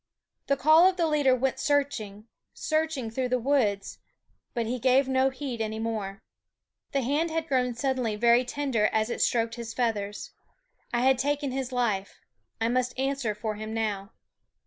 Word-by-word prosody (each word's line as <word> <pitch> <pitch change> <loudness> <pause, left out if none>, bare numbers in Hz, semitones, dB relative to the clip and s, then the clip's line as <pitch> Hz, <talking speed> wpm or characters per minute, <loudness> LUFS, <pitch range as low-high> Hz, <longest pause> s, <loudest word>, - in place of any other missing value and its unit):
The 280 - +2
call 315 +7 +6
of 375 - -5
the 340 - +2
leader 290 -4 +3
went 260 +1 -1
searching, 225 -8 -1 0.3
searching 310 -7 -1
through 255 +2 -2
the 255 - +2
woods; 235 -6 0 0.6
but 235 -1 0
he 245 +3 -2
gave 260 +2 +3
no 265 0 +3
heed 260 -3 -5
any 220 0 -2
more. 220 -3 -4 0.7
The 275 -1 0
hand 295 +7 +1
had 325 0 -2
grown 250 -3 +1
suddenly 255 -4 -1
very 235 +3 +4
tender 250 -4 0
as 220 +2 0
it - - -3
stroked 230 -1 +1
his 230 -1 -6
feathers. 210 -4 -2 0.6
I 240 -1 +1
had 260 0 +4
taken 285 0 0
his 260 0 -3
life; 215 -6 -1 0.4
I 225 - +1
must 250 +1 0
answer 270 -5 -1
for 215 0 -3
him 215 +1 -5
now. 210 -2 -2
250 Hz, 170 wpm, -27 LUFS, 225-275 Hz, 0.7 s, call